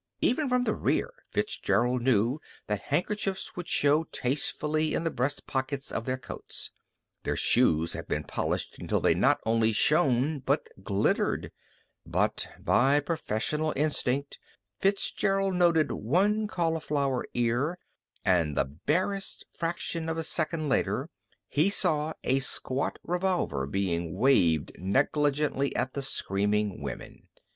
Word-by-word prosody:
Even 275 +3 +1
from 250 0 +2
the 220 - +1
rear, - - 0 0.2
Fitzgerald 120 +5 0
knew 120 +2 +2 0.3
that 105 -1 -2
handkerchiefs 190 +5 -2
would 175 -2 -6
show 150 +3 +3
tastefully 150 +3 -1
in - - -1
the 165 - 0
breast 130 +4 -2
pockets 135 +1 -3
of 115 - -3
their 130 0 -1
coats. 125 -2 -9 0.5
Their - - -2
shoes 85 -9 +3
had - - -6
been - - -1
polished - - -3
until - - 0
they - - +3
not - - +3
only 115 0 +3
shone, 140 +3 +2
but 135 +3 0
glittered. 100 +1 0 0.5
But - - 0
by 135 +4 +3
professional 150 0 -1
instinct 140 -2 -1 0.4
Fitzgerald 195 0 +1
noted 170 -3 +3
one 205 - +1
cauliflower 150 - -1
ear, 120 +8 +1 0.5
and 85 -5 +2
the - - +3
barest 170 - -2
fraction 165 -1 -3
of 160 - -2
a 165 - -1
second 155 0 -1
later 135 - 0 0.4
he 155 +7 +2
saw 160 -6 +3
a 135 +1 +2
squat 135 0 -1
revolver 175 - -1
being 85 -1 -1
waved 90 - +3
negligently 140 - +1
at 130 - -1
the 140 - -3
screaming 105 - -1
women. 70 -2 -7
140 Hz, 130 wpm, -28 LUFS, 115-165 Hz, 0.5 s, show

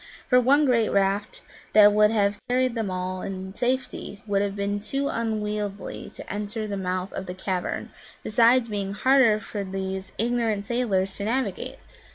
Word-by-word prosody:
For 250 - +5
one 285 +4 +4
great 235 -4 +3
raft 200 +1 0 0.3
that 210 -1 +8
would 210 0 +5
have 205 -2 +1
carried 255 0 +2
them 225 -4 -2
all 185 0 -3
in 190 0 -6
safety 250 -4 -2
would 200 -2 +1
have 200 -1 -1
been 200 0 -1
too 275 +7 0
unwieldy 210 -3 -3
to - - -7
enter 210 +2 -3
the 205 - -3
mouth 185 0 -3
of 190 - -5
the 180 - -5
cavern, 185 -1 -3 0.3
besides 235 +2 +4
being 200 -2 -3
harder 245 -1 +4
for 205 -1 -5
these 190 0 -4
ignorant 225 -2 0
sailors 200 -5 0
to 200 - -3
navigate. 230 -3 -2
210 Hz, 165 wpm, -25 LUFS, 195-230 Hz, 0.3 s, that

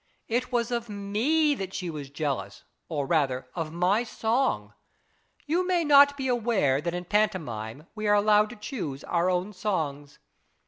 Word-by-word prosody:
It 245 +3 -1
was 240 -1 0
of 235 -1 -2
rne 225 +10 +1
that 190 -1 -5
she 180 -2 -3
was 145 -3 -7
jealous, 140 -9 -3 0.3
or 145 -4 -1
rather 135 -5 0
of 165 -2 -4
my 180 +7 +2
song. 240 +3 -1 0.7
You 335 +5 +1
may 350 -3 +2
not 285 -1 +7
be 265 -1 -2
aware 225 - +1
that 170 +2 -2
in 180 0 -4
pantomime 155 - -1
we 215 -1 -3
are 205 - +5
allowed 210 +1 +4
to 240 - -9
choose 210 - -5
our 175 +1 +1
own 185 +3 -1
songs. 150 -8 -3
200 Hz, 165 wpm, -27 LUFS, 155-235 Hz, 0.7 s, not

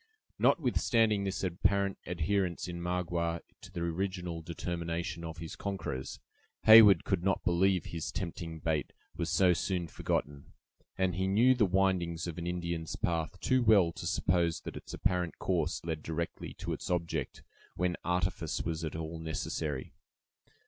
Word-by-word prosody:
Notwithstanding 115 -7 +3
this 95 0 -2
apparent 100 +2 +1
adherence 90 +1 0
in 85 -1 -5
Magua 85 -1 -1 0.2
to - - -12
the 85 -1 -5
original 90 0 -2
determination 85 0 -4
of 80 0 -6
his 80 -1 -7
conquerors, 95 -10 -4 0.4
Heyward 110 -5 +9
could 95 -3 0
not 95 0 +1
believe 90 0 +2
his 85 -2 -4
tempting 85 -3 -5
bait 80 -3 -1 0.2
was 85 - -2
so 90 +1 +4
soon 90 0 -1
forgotten; 75 -2 -3 0.4
and 95 -1 +1
he 95 +2 0
knew 115 +7 +5
the 115 -5 +3
windings 90 -3 +1
of 85 -1 -5
an 85 - -4
Indian's 85 -2 -3
path 85 +2 -2
too 130 -1 +3
well 105 -7 +5
to - - -6
suppose 85 -2 +1
that - - -7
its - - -9
apparent 90 -2 -1
course 85 -3 -1
led 80 -2 -3
directly 80 +2 -4
to - - -4
its - - -6
object, 85 -5 -2 0.3
when 90 0 0
artifice 90 -2 -1
was 85 0 -3
at 80 - -4
all 80 0 -5
necessary. 80 -3 -3
85 Hz, 150 wpm, -31 LUFS, 80-95 Hz, 0.4 s, Heyward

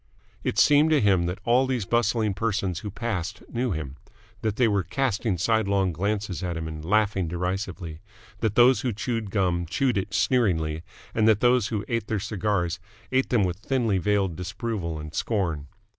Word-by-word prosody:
It - - -2
seemed 150 +2 +5
to 155 -2 +4
him 95 -6 +3
that 90 +2 -3
all 125 +2 +4
these 125 -6 -1
bustling 115 -1 +1
persons 95 -4 -1
who 105 - -6
passed 95 -4 -4
knew 125 +1 0
him, 75 -7 -4 0.4
that 110 -2 -1
they 120 0 +3
were 100 -2 +2
casting 110 - -1
sidelong 100 -1 +1
glances 100 +2 -2
at 90 -3 -3
him 80 0 -4
and 80 -1 -7
laughing 100 0 +1
derisively, 90 -1 -4 0.4
that 110 -2 0
those 125 +2 +6
who 125 -3 -1
chewed 115 0 -3
gum 90 -4 0
chewed 125 +3 +1
it 95 - -4
sneeringly 80 -11 +1 0.3
and 110 -1 +2
that 110 -2 +5
those 120 -2 +3
who 110 -3 -3
ate 115 -3 -2
their 110 - -1
cigars 95 -4 -1 0.3
ate 130 0 +2
them 115 -5 +3
with 90 -2 -1
thinly 115 -3 0
veiled 95 -1 +1
disapproval 90 -2 -3
and 75 0 -8
scorn. 85 -10 -1
100 Hz, 175 wpm, -26 LUFS, 90-115 Hz, 0.4 s, those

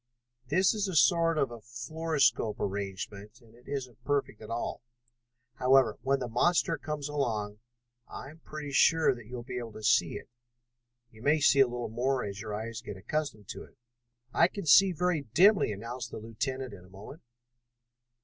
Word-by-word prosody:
"This 185 - +3
is 210 -2 -1
a 185 - -4
sort 165 +1 +4
of 135 -5 +1
a 120 -1 -9
fluoroscope 130 0 0
arrangement, 100 +2 -5
and 115 -3 -21
it 120 +2 -21
isn't 125 -4 -6
perfect 140 -5 -1
at 110 - -10
all. 115 +1 -3 0.8
However, 130 -3 +4
when 135 +2 +1
the 125 -2 -4
monster 165 +8 +2
comes 150 -2 -4
along, 110 -8 -2 0.5
I 140 - -9
am 160 - -17
pretty 150 -2 -7
sure 160 +4 +4
that 120 -3 -12
you 125 - -8
will 120 - -6
be 125 0 -5
able 115 -2 -7
to 110 - -10
see - - +3
it. - - -8 0.8
You 110 - -16
may 150 +5 +3
see 140 -1 +4
a 135 - +7
little 120 0 -4
more 125 +4 -1
as 100 0 -6
your 110 -1 -6
eyes 110 +1 -5
get 105 -5 -8
accustomed 115 -2 -4
to - - -6
it." - - -19 0.6
"I 170 - +5
can 200 0 -7
see 190 +5 +7
very 180 -1 0
dimly," 195 - +5
announced 115 +5 -6
the - - -7
lieutenant 125 +3 -4
in 90 -3 -11
a 90 - -18
moment. 105 - -12
125 Hz, 185 wpm, -29 LUFS, 110-150 Hz, 0.8 s, a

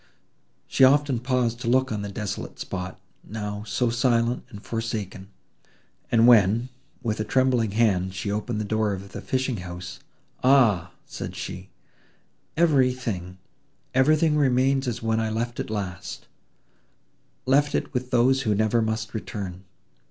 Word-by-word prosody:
She - - +2
often 140 -1 +5
paused 125 -2 0
to 120 - -5
look 130 +1 +2
on 105 -1 -2
the 100 - -4
desolate 100 -1 -5
spot, 95 -1 -5 0.2
now 105 -1 -5
so 120 0 0
silent 120 0 +1
and 105 -5 -10
forsaken, 110 -5 -4 0.8
and 115 0 +5
when, 115 +1 +5 0.3
with 110 -3 -1
a - - +1
trembling 125 -3 +2
hand, 95 -5 +1
she 100 +2 -3
opened 105 +2 -2
the 110 - -2
door 110 0 0
of 100 +1 -7
the - - -7
fishing 130 -2 -1
house, 90 0 -7 0.4
"Ah!" 110 -10 +4
said - - -7
she, 95 +1 -6 0.9
"everything—everything 130 - 0
remains 135 -1 +2
as 115 -2 -3
when 110 0 +1
I 110 -1 0
left 120 +2 -3
it - - -3
last—left 105 - -4
it - - -2
with 125 -1 -2
those 130 +2 +3
who 110 -5 +1
never 110 +2 +2
must 110 0 -2
return!" 100 -4 -6
115 Hz, 135 wpm, -25 LUFS, 100-130 Hz, 0.9 s, often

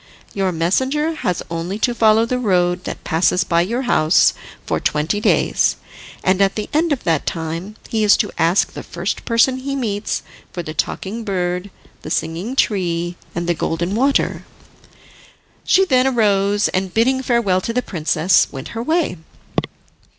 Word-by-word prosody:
Your 195 -2 0
messenger 260 - 0
has 180 - -2
only 170 +4 -3
to 240 +2 +1
follow 225 -1 +4
the 250 +2 -1
road 180 -5 +1
that - - -6
passes 180 +3 +2
by 170 -2 +2
your 235 +9 -1
house, 160 -9 +4 0.3
for - - -1
twenty 155 +7 0
days, - - +2 0.5
and 185 +1 +2
at 195 0 +3
the 215 - -4
end 320 +2 +2
of 275 - -1
that 165 -4 0
time, 165 +5 -4
he 220 -1 0
is 205 -1 +6
to - - -1
ask 170 +4 +3
the - - -6
first - - -4
person 235 +2 +3
he 275 +1 -4
meets 215 -6 -2 0.3
for 175 - -5
the 155 - -6
Talking 200 +8 -3
Bird, 180 -1 -2 0.3
the - - -8
Singing 165 +10 -2
Tree, 175 -7 0 0.2
and 170 0 -2
the 175 - +2
Golden 170 +3 -2
Water." 270 +5 +1 1.2
She 385 +1 +4
then 260 -4 +2
rose, 205 -2 +2
and 185 0 -2
bidding 260 +6 +2
farewell 235 -8 +1
to 230 - -3
the 250 +2 -1
princess, 165 +1 +2
went 135 -1 -7
her 230 - -5
way. 315 - 0
200 Hz, 165 wpm, -19 LUFS, 175-240 Hz, 1.2 s, is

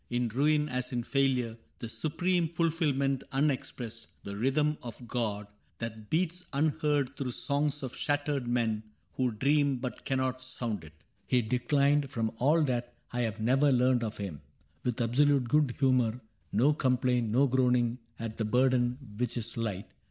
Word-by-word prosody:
In 120 -1 0
ruin 150 +5 +2
as 125 -2 -3
in 120 -1 -1
failure, 125 -4 +1 0.2
the 115 - -6
supreme 170 +6 0
Fulfillment 150 -5 +1
unexpressed, 130 -5 -2 0.2
the 100 - -6
rhythm 150 +7 +1
of 120 0 -9
God 110 -4 -2 0.3
That 110 -2 -6
beats 180 +2 0
unheard 145 -2 +1
through 130 -4 -3
songs 145 +1 -1
of 130 - -5
shattered 145 -3 -1
men 115 -3 +1 0.4
Who 130 -1 +2
dream 140 +5 +2
but 125 0 -5
cannot 130 -1 -1
sound 120 -7 -4
it. 75 -1 -13 0.2
— - - -40
He 125 -1 +3
declined. 140 +4 +2
From 115 -5 -1
all 155 +5 +4
that 120 -3 -2 0.2
I 125 - -1
have 110 -1 -1
ever 135 +3 +4
learned 125 -1 +3
of 110 -1 -4
him. 95 -8 -5 0.4
With 125 -2 -1
absolute 130 +2 +3
good 145 -1 +2
humor. 125 -4 +2 0.3
No 135 +8 +4
complaint. 125 -4 +1
No 130 +6 +4
groaning 125 -2 +2 0.2
at 115 -1 -5
the 110 - -1
burden 125 +1 +2 0.2
which 125 0 -1
is 115 -1 -4
light. 105 -4 -3
125 Hz, 160 wpm, -30 LUFS, 115-140 Hz, 0.4 s, all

